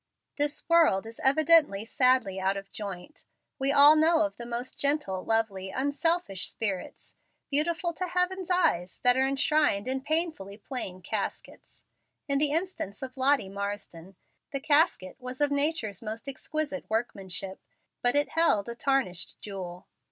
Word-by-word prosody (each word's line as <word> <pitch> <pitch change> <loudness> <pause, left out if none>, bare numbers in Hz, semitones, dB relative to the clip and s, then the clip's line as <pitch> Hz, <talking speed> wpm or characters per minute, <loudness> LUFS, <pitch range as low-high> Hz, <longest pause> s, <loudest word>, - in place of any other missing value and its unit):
This 290 0 -2
world 325 - +4
is 225 0 -10
evidently 290 -7 +4
sadly 250 -6 +2
out 190 +1 0
of 195 0 -9
joint. 200 - -8 0.4
We 270 +1 +3
all 290 +2 +8
know 320 +1 +4
of 300 - -5
the 235 - -8
most 240 +1 -5
gentle, 280 -11 0
lovely, 210 -4 0
unselfish 285 - 0
spirits, 200 -5 -4 0.4
beautiful 340 +4 +1
to 365 +3 -4
Heaven's 360 +1 -1
eye, 350 - +2 0.2
that 250 0 +5
are 265 +1 +2
enshrined 275 -5 +1
in 265 +1 -1
painfully 310 - -1
plain 200 -6 -6
caskets. - - -6 0.4
In 280 -1 +1
the 295 0 +2
instance 320 - -2
of 255 -1 -7
Lottie 270 -4 +2
Marsden, 195 -3 -6 0.4
the 275 - -3
casket 290 - +1
was 255 0 -7
of 290 -1 +2
nature's 280 - 0
most 225 +3 -6
exquisite 285 +1 -4
workmanship, 195 -4 -3 0.4
but 245 +2 +2
it 290 0 +3
held 315 -11 +2
a - - -4
tarnished 250 -8 0
jewel. 185 -2 -8
260 Hz, 145 wpm, -28 LUFS, 200-300 Hz, 0.4 s, all